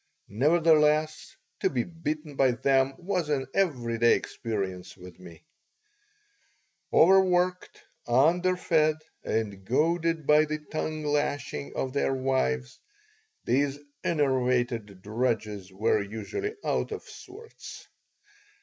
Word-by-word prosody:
Nevertheless, 155 - +2 0.2
to - - +1
be 125 -4 -1
beaten 155 -3 -5
by 130 -2 +3
them 135 +1 +2
was 180 -3 -2
an 135 -3 0
every 125 -12 0
day 120 0 +5
experience 95 -6 -5
with 90 -1 -13
me 85 -2 -13 1.5
Overworked, 180 0 +3 0.3
underfed, 160 +3 +3 0.3
and 100 -3 -2
goaded 165 - 0
by 150 +1 +5
the 155 0 -3
tongue 155 0 -4
lashings 145 - -2
of 130 -1 -3
their 135 -1 0
wives, 95 - -1 0.7
these 140 +2 +1 0.3
enervated 125 - 0
drudges 110 -4 -2
were 105 +2 +1
usually 255 - -5
out - - -1
of 435 - -5
sorts. 420 +5 -12
140 Hz, 105 wpm, -27 LUFS, 115-160 Hz, 1.5 s, day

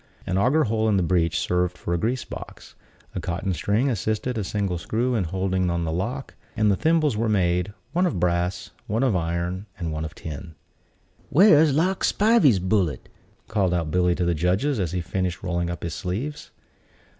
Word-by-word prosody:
An 95 - -2
auger 130 +11 +3
hole 110 -2 +1
in 100 - +3
the 95 - +2
breech 85 -2 +1
served 90 0 0
for 85 - -3
a - - +2
grease 120 +6 -1
box; - - -10 0.4
a - - -3
cotton 90 +2 -2
string 105 +9 +1
assisted 110 +1 -1
a 110 - -1
single 95 -2 -2
screw 120 +8 -1
in 105 -6 +1
holding 95 +1 0
on 85 0 -1
the 80 - -2
lock; 115 +11 -3 0.2
and 105 -1 +3
the - - +3
thimbles 155 - +2
were 110 +1 0
made, 90 -2 +1 0.2
one 180 +2 +3
of 155 - -2
brass, 90 +1 -1 0.2
one 110 +5 0
of 125 -7 +2
iron, 85 +3 -2
and 85 -3 -3
one 80 0 -3
of 80 0 -6
tin. 80 +1 -8 0.7
"Where's 155 -3 +6
Lark 185 +5 +1
Spivey's 205 - +4
bullet?" 95 -3 0 0.4
called 95 -5 +1
out 80 -3 -1
Billy 90 0 +2
to 90 - -1
the 85 - +2
judges, 95 - +1
as 90 -4 -1
he 90 0 -1
finished 90 +2 -3
rolling 85 -2 -1
up 85 - -5
his 85 -2 -3
sleeves. 110 - -4
95 Hz, 190 wpm, -24 LUFS, 85-115 Hz, 0.7 s, Where's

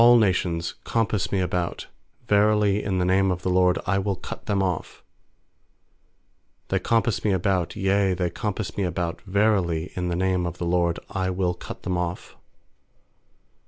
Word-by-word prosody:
10A11 120 0 +8
nations 90 -5 +1
compass 110 -4 0
me 100 - +1
about, 90 -1 -2 0.4
Verily, 105 -1 +3
in 95 -2 -1
the 90 - +1
name 95 +1 +3
of 90 -1 -2
the 90 - 0
LORD 90 -1 +4
I 95 0 +1
will 100 0 -1
cut - - -9
them 100 -2 +1
off. 90 -4 -3 1.7
uThey - - +1
compass 115 -2 +1
me 105 - +2
about, 90 -2 0
yea, 95 -1 +2
they 90 -1 -1
compass 105 +2 -3
me 100 - +1
about; 85 -1 -2
Verily, 95 -5 +1
in 90 -1 -2
the 85 - -1
name 90 -1 +1
of 85 +1 -6
the 85 - -3
LORD 85 -1 +1
I 95 -1 -1
will 90 -1 0
cut - - -9
them 90 -1 -1
off. 90 0 -4
95 Hz, 165 wpm, -25 LUFS, 90-100 Hz, 1.7 s, 10A11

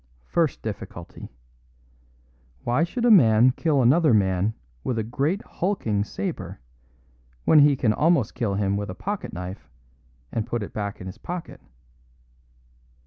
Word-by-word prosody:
First 165 - 0
difficulty: 100 -5 -7 1.3
Why 125 +7 +1
should 235 +8 -2
a 240 - +6
man 120 - +6
kill 145 0 +1
another 140 +1 +5
man 95 +1 +1 0.3
with 125 - -2
a 110 - 0
great 140 - -1
hulking 115 - -1
sabre, 105 - -5 0.9
when 155 - +6
he 145 -1 +6
can 110 -4 +1
almost 150 -4 +2
kill 105 -5 -1
him 100 0 0
with 100 -1 -4
a 95 - -6
pocket 205 - -4
knife 90 -5 -7 0.6
and 115 0 -2
put 120 -2 -2
it - - -8
back 100 -1 -4
in - - -7
his 95 +4 -8
pocket? 175 +4 -7
115 Hz, 140 wpm, -24 LUFS, 100-155 Hz, 1.3 s, a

